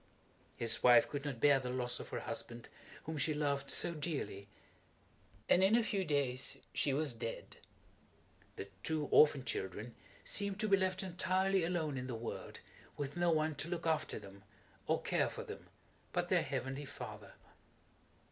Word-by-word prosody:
His 115 Hz, -1 st, +1 dB
wife 120 Hz, -1 st, +7 dB
could 145 Hz, 0 st, -5 dB
not 135 Hz, -5 st, -3 dB
bear 145 Hz, +2 st, +5 dB
the 125 Hz, -1 st, -4 dB
loss 125 Hz, -1 st, -2 dB
of -, -, -8 dB
her -, -, -4 dB
husband, 120 Hz, 0 st, -5 dB, 0.3 s
whom 160 Hz, -1 st, -4 dB
she 155 Hz, +1 st, +1 dB
loved 145 Hz, -2 st, -1 dB
so 170 Hz, -, +3 dB
dearly, 145 Hz, -, -4 dB, 1.0 s
and 185 Hz, -, +5 dB
in 195 Hz, +4 st, +5 dB
a 235 Hz, -, +4 dB
few 200 Hz, -3 st, 0 dB
days 140 Hz, -5 st, +1 dB, 0.2 s
she 140 Hz, -, +2 dB
was 145 Hz, -1 st, +1 dB
dead. 115 Hz, 0 st, -6 dB, 1.0 s
The 100 Hz, -, -6 dB
two 155 Hz, +2 st, 0 dB
orphan 145 Hz, -3 st, +6 dB
children 105 Hz, +5 st, -4 dB, 0.3 s
seemed 200 Hz, 0 st, 0 dB
to 215 Hz, -, +1 dB
be 200 Hz, -, +6 dB
left 190 Hz, -1 st, 0 dB
entirely 185 Hz, +1 st, +1 dB
alone 160 Hz, -5 st, -1 dB
in 125 Hz, -, -5 dB
the 125 Hz, -, -4 dB
world, 115 Hz, +1 st, -6 dB, 0.4 s
with 145 Hz, -1 st, -4 dB
no 175 Hz, 0 st, +2 dB
one 155 Hz, -1 st, +2 dB
to 155 Hz, -, -3 dB
look 170 Hz, -2 st, -3 dB
after 160 Hz, -1 st, 0 dB
them, 100 Hz, -1 st, -12 dB, 0.4 s
or -, -, +1 dB
care -, -, +1 dB
for -, -, -6 dB
them, -, -, -9 dB, 0.5 s
but -, -, 0 dB
their -, -, +4 dB
Heavenly 135 Hz, +2 st, -3 dB
Father. -, -, -9 dB
145 Hz, 165 wpm, -35 LUFS, 125-175 Hz, 1.0 s, wife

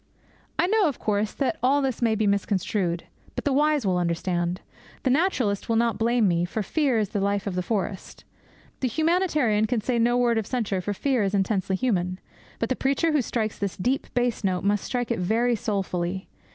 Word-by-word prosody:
I -, -, +3 dB
know, 415 Hz, 0 st, +3 dB
of 285 Hz, -, -2 dB
course, 210 Hz, 0 st, 0 dB
that 280 Hz, +3 st, -1 dB
all 270 Hz, +4 st, +3 dB
this 265 Hz, -4 st, -1 dB
may 225 Hz, -2 st, +3 dB
be 215 Hz, 0 st, +1 dB
misconstrued. 195 Hz, -3 st, 0 dB, 0.3 s
But -, -, -3 dB
the 285 Hz, -, +2 dB
wise 295 Hz, -2 st, +2 dB
will 185 Hz, -2 st, +2 dB
understand. 175 Hz, +1 st, -1 dB, 0.4 s
The 260 Hz, -, +2 dB
naturalist 255 Hz, -, +1 dB
will 230 Hz, -, +2 dB
not 230 Hz, 0 st, +1 dB
blame 230 Hz, -1 st, +3 dB
me, 170 Hz, -1 st, +2 dB
for 205 Hz, +5 st, -2 dB
fear 275 Hz, +1 st, +1 dB
is 210 Hz, -3 st, 0 dB
the 205 Hz, -, -2 dB
life 200 Hz, 0 st, 0 dB
of 200 Hz, -, -2 dB
the 180 Hz, -, -1 dB
forest. 195 Hz, 0 st, -3 dB, 0.6 s
The 260 Hz, -, 0 dB
humanitarian 305 Hz, -, +2 dB
can 240 Hz, +1 st, 0 dB
say 240 Hz, +2 st, 0 dB
no 240 Hz, +1 st, +3 dB
word 240 Hz, -2 st, +3 dB
of 215 Hz, -, -4 dB
censure, 215 Hz, -7 st, -1 dB
for 205 Hz, +3 st, -2 dB
fear 265 Hz, +1 st, +1 dB
is 200 Hz, 0 st, 0 dB
intensely 195 Hz, -1 st, 0 dB
human. 185 Hz, -5 st, 0 dB, 0.4 s
But 230 Hz, -, -2 dB
the 260 Hz, -, +1 dB
preacher 280 Hz, +6 st, +1 dB
who 300 Hz, -2 st, +3 dB
strikes 220 Hz, -3 st, -2 dB
this 200 Hz, -1 st, -3 dB
deep 255 Hz, +8 st, -1 dB
bass 245 Hz, -2 st, 0 dB
note 185 Hz, -2 st, 0 dB
must 205 Hz, 0 st, +1 dB
strike 245 Hz, -2 st, -2 dB
it 230 Hz, -, 0 dB
very 230 Hz, +6 st, +2 dB
soulfully. 190 Hz, -3 st, -2 dB
220 Hz, 205 wpm, -25 LUFS, 195-255 Hz, 0.6 s, I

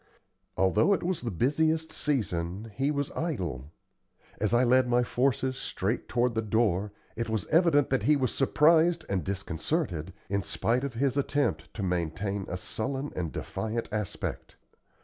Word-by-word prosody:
Although 95 Hz, -, +4 dB
it -, -, -5 dB
was 180 Hz, 0 st, -1 dB
the 120 Hz, -, -2 dB
busiest 155 Hz, -, +1 dB
season, 105 Hz, -, -2 dB
he 135 Hz, +6 st, 0 dB
was 145 Hz, -2 st, -1 dB
idle. 85 Hz, -, -3 dB, 0.7 s
As 105 Hz, -1 st, +1 dB
I 120 Hz, +1 st, +4 dB
led 130 Hz, +1 st, +4 dB
my 120 Hz, 0 st, +3 dB
forces 130 Hz, +1 st, 0 dB
straight 105 Hz, +6 st, -2 dB
toward 120 Hz, +2 st, +1 dB
the 110 Hz, -, 0 dB
door, 105 Hz, -3 st, +1 dB, 0.2 s
it 115 Hz, 0 st, -3 dB
was 110 Hz, -4 st, -1 dB
evident 160 Hz, -5 st, +4 dB
that 135 Hz, -, +2 dB
he 150 Hz, +8 st, +4 dB
was 130 Hz, -4 st, 0 dB
surprised 165 Hz, +4 st, +4 dB
and 95 Hz, -4 st, 0 dB
disconcerted, 95 Hz, -, -2 dB, 0.2 s
in 100 Hz, +1 st, 0 dB
spite 115 Hz, +9 st, 0 dB
of 140 Hz, -4 st, -4 dB
his 135 Hz, +2 st, +1 dB
attempt 140 Hz, -2 st, 0 dB
to 105 Hz, -, -3 dB
maintain 95 Hz, +3 st, -2 dB
a 90 Hz, -, -3 dB
sullen 130 Hz, +9 st, -4 dB
and 85 Hz, -4 st, -2 dB
defiant 110 Hz, +1 st, -3 dB
aspect. 105 Hz, -3 st, -4 dB
120 Hz, 155 wpm, -29 LUFS, 100-140 Hz, 0.7 s, Although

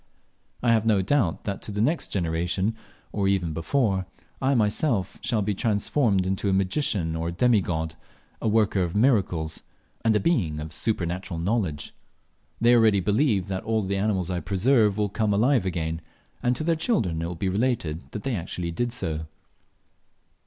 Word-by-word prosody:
I 120 Hz, -, +4 dB
have 110 Hz, -2 st, +3 dB
no 105 Hz, -4 st, +3 dB
doubt 100 Hz, -, +1 dB
that 100 Hz, -2 st, -4 dB
to -, -, -5 dB
the 105 Hz, -, -4 dB
next 150 Hz, +10 st, +1 dB
generation, 90 Hz, +4 st, -1 dB, 0.4 s
or 100 Hz, -2 st, 0 dB
even 90 Hz, -5 st, +1 dB
before, 95 Hz, -, 0 dB, 0.3 s
I 135 Hz, +1 st, +2 dB
myself 110 Hz, -, +1 dB
shall 115 Hz, -3 st, 0 dB
be 105 Hz, +1 st, 0 dB
transformed 105 Hz, -1 st, +1 dB
into 95 Hz, +2 st, -1 dB
a -, -, +2 dB
magician 95 Hz, -, 0 dB
or 80 Hz, +1 st, -2 dB
a -, -, -2 dB
demigod, 85 Hz, -6 st, +1 dB, 0.5 s
a -, -, 0 dB
worker 105 Hz, -2 st, +2 dB
of 85 Hz, 0 st, -2 dB
miracles, 95 Hz, -, +2 dB, 0.4 s
and 110 Hz, -1 st, +3 dB
a -, -, +4 dB
being 95 Hz, -, +1 dB
of 75 Hz, +1 st, -6 dB
supernatural 90 Hz, -3 st, -2 dB
knowledge. 90 Hz, -5 st, -1 dB, 0.7 s
They 120 Hz, +2 st, +5 dB
already 110 Hz, -4 st, +5 dB
believe 105 Hz, -, +2 dB
that 95 Hz, -1 st, -3 dB
all 110 Hz, -1 st, 0 dB
the 100 Hz, +1 st, -1 dB
animals 95 Hz, -3 st, 0 dB
I 90 Hz, -, -1 dB
preserve 105 Hz, -, +2 dB
will 105 Hz, -1 st, +1 dB
come 105 Hz, +2 st, -1 dB
to 100 Hz, -, +2 dB
life 125 Hz, -1 st, +3 dB
again; 80 Hz, -2 st, -2 dB, 0.4 s
and 125 Hz, 0 st, +1 dB
to 155 Hz, -, -3 dB
their 165 Hz, +1 st, +2 dB
children 110 Hz, -, 0 dB
it 85 Hz, -, -2 dB
will 90 Hz, -, -5 dB
be 95 Hz, +4 st, -2 dB
related 95 Hz, -6 st, 0 dB
that 105 Hz, -, -6 dB
they 135 Hz, -3 st, -1 dB
actually 85 Hz, -1 st, -4 dB
did 120 Hz, +8 st, -1 dB
so. 80 Hz, -9 st, -3 dB
100 Hz, 175 wpm, -25 LUFS, 85-115 Hz, 0.7 s, They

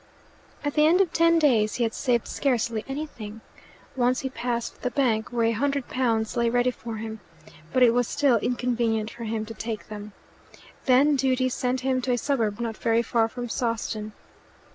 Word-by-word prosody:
At 290 Hz, -1 st, -1 dB
the 305 Hz, 0 st, +4 dB
end 345 Hz, +4 st, +4 dB
of 380 Hz, -4 st, +2 dB
ten 335 Hz, 0 st, +4 dB
days 230 Hz, -9 st, +3 dB
he 245 Hz, -, 0 dB
had 225 Hz, -1 st, 0 dB
saved 245 Hz, -4 st, 0 dB
scarcely 235 Hz, -5 st, 0 dB
anything. 240 Hz, -7 st, -6 dB, 0.5 s
Once 250 Hz, 0 st, +2 dB
he 265 Hz, -, -4 dB
passed 235 Hz, -1 st, -3 dB
the 250 Hz, -, 0 dB
bank 235 Hz, -4 st, +1 dB
where 235 Hz, -1 st, +1 dB
a 225 Hz, -, +3 dB
hundred 275 Hz, +3 st, -1 dB
pounds 230 Hz, -3 st, 0 dB
lay 235 Hz, -1 st, +2 dB
ready 245 Hz, +1 st, +2 dB
for 230 Hz, -2 st, -7 dB
him, 220 Hz, 0 st, -6 dB, 0.5 s
but 255 Hz, -, +4 dB
it 240 Hz, -, +7 dB
was 245 Hz, -1 st, +2 dB
still 280 Hz, -5 st, +3 dB
inconvenient 230 Hz, -2 st, 0 dB
for 235 Hz, -, -8 dB
him 220 Hz, 0 st, -2 dB
to 225 Hz, -, -8 dB
take 225 Hz, -1 st, -5 dB
them. 210 Hz, -1 st, -8 dB, 0.7 s
Then 275 Hz, +3 st, +5 dB
duty 255 Hz, -1 st, +1 dB
sent 255 Hz, 0 st, -1 dB
him 260 Hz, 0 st, 0 dB
to 250 Hz, 0 st, 0 dB
a -, -, +1 dB
suburb 230 Hz, -6 st, 0 dB
not 230 Hz, -2 st, -3 dB
very 230 Hz, 0 st, +2 dB
far 230 Hz, -1 st, +2 dB
from 245 Hz, +1 st, -6 dB
Sawston. 225 Hz, -3 st, -2 dB
240 Hz, 185 wpm, -25 LUFS, 225-260 Hz, 0.7 s, it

